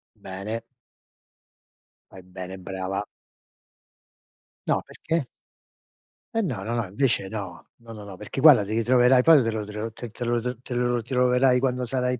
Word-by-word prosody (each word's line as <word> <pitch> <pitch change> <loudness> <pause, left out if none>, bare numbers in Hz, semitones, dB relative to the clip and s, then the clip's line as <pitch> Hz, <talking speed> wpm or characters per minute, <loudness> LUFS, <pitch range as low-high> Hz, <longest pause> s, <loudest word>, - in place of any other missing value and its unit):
Bene. 100 +4 -6 1.5
Fai 95 - -12
bene, 95 +1 -8
brava. 95 +2 -4 1.6
No, - - +1
perché? 160 -5 -3 1.1
Eh 225 - +2
no, 125 - -3
no, 115 +3 -2
no 115 -2 -1
invece 100 0 0
no, 100 -4 -7
no, 115 -1 -12
no, 105 -2 -9
no, 100 -2 -10
perché, 105 +6 -5
guarda, 140 -9 +8
ti 100 - -7
ritroverai 125 +2 +4
poi 160 -2 +7
te 115 - 0
lo 110 -1 -3
te 105 - -9
lo 110 +2 -4
te 120 +1 -8
te 120 - -6
lo 120 0 +1 0.2
te 125 - -7
lo 120 0 0
troverai 125 +1 +3
quando 125 -1 0
sarai 125 0 -1
115 Hz, 160 wpm, -25 LUFS, 100-125 Hz, 1.6 s, guarda